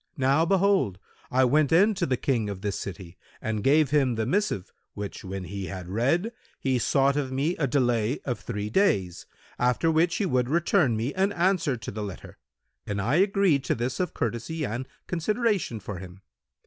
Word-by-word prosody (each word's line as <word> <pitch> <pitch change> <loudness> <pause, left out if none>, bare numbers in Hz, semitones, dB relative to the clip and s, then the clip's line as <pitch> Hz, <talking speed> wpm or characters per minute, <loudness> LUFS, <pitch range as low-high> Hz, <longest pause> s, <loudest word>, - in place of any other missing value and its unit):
Now, 140 +4 +3
behold, 195 - +2 0.3
I 130 +1 +3
went 145 +3 +3
in 200 +7 +5
to 185 -3 -1
the 130 -2 +1
King 115 -6 0
of 95 -2 -6
this 100 -1 -2
city 90 -2 -8 0.2
and 110 -2 -3
gave 145 0 +4
him 135 -5 +3
the 110 0 -1
missive, 165 - -1 0.2
which 100 -1 -6
when 95 0 -5
he 100 +2 -5
had 90 -2 -6
read, 140 - +1 0.3
he 130 -2 +1
sought 135 +4 +2
of 140 -3 -1
me 145 +7 0
a 150 - +1
delay 120 -2 +1
of 125 -3 -2
three 105 -2 -4
days, 100 - +1 0.3
after 125 +7 +2
which 165 +2 +2
he 205 - 0
would 125 -7 +1
return 160 - +2
me 120 +6 -2
an 195 +2 +1
answer 175 -7 +1
to 110 - -7
the 105 - -5
letter 100 -4 -9 0.5
and 105 -1 -2
I 120 +10 +1
agreed 195 -7 +3
to - - +1
this 120 +2 -3
of 180 -3 -2
courtesy 120 +8 -2
and 125 +3 -4 0.2
consideration 195 - 0
for 100 -3 -7
him. 95 +1 -11
130 Hz, 185 wpm, -26 LUFS, 105-165 Hz, 0.5 s, in